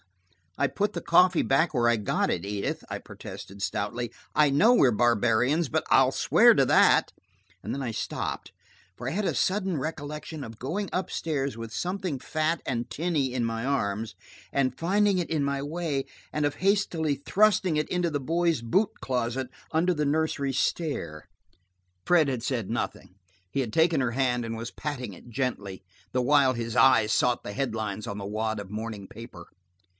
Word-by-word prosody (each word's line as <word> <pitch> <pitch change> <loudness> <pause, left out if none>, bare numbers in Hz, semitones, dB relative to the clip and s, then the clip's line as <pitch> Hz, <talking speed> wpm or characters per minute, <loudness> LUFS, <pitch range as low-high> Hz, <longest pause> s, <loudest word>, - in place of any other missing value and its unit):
'" 90 -3 -39
"I - - +4
put 205 +1 -1
the - - -4
coffee 180 -2 +4
back 155 +5 +2
where 120 -3 +2
I 120 - +4
got 105 -3 0
it, 85 - -1
Edith," 100 0 -3
I - - -3
protested 100 +1 -10
stoutly. 115 +4 -2 0.2
"I 150 -1 +5
know 205 - +5
we're 135 - +5
barbarians, 120 +6 +2
but - - 0
I'll - - +5
swear - - +5
to - - +4
that." - - +4 0.5
And - - -4
then 140 - -3
I 120 - -2
stopped, 110 - -4 0.5
for 125 - -6
I - - -1
had 205 +4 -1
a - - +1
sudden 190 -3 0
recollection 150 +1 -5
of 115 -3 -10
going 185 +10 -3
up 185 0 -2
stairs 140 -6 -2
with 115 -1 -7
something 180 - -3
fat 155 +5 -1
and 120 -1 -2
tinny 145 +1 -1
in 125 -2 0
my 115 0 -2
arms, 110 -5 -1 0.4
of 130 -2 +1
finding 195 +5 +2
it 175 - -3
in 155 -3 0
my 140 0 -1
way, 150 -2 -2 0.3
and 150 -1 0
of 145 - -1
hastily 180 -6 +1
thrusting 185 +2 +2
it 150 - 0
into 180 -1 0
the 145 -2 -2
boys' 165 0 0
boot 190 - +1
closet 125 0 -2 0.2
under 170 +3 +2
the 150 -2 -1
nursery 145 -2 0
stair. 130 - -2 0.8
Fred 170 -4 +4
had 125 -4 -2
said 125 -7 -2
nothing. 90 - -4 0.4
He 140 - 0
had 120 -4 -3
taken 160 -1 +3
her 125 -2 0
hand 125 -1 0
and 115 0 -4
was 115 +1 -6
patting 130 -8 -5
it 105 +7 -14
gently, 105 -7 -3 0.3
the 125 - +1
while 140 -1 +4
his 115 -2 -4
eyes 110 -5 +5
sought 125 -1 +2
the 100 - -6
head 135 -2 -2
lines 110 -1 -4
on 100 -2 -4
the 100 - -5
wad 110 +1 -2
of 100 -2 -8
morning 105 -1 -5
paper. 110 -6 -11
135 Hz, 185 wpm, -27 LUFS, 115-160 Hz, 0.8 s, I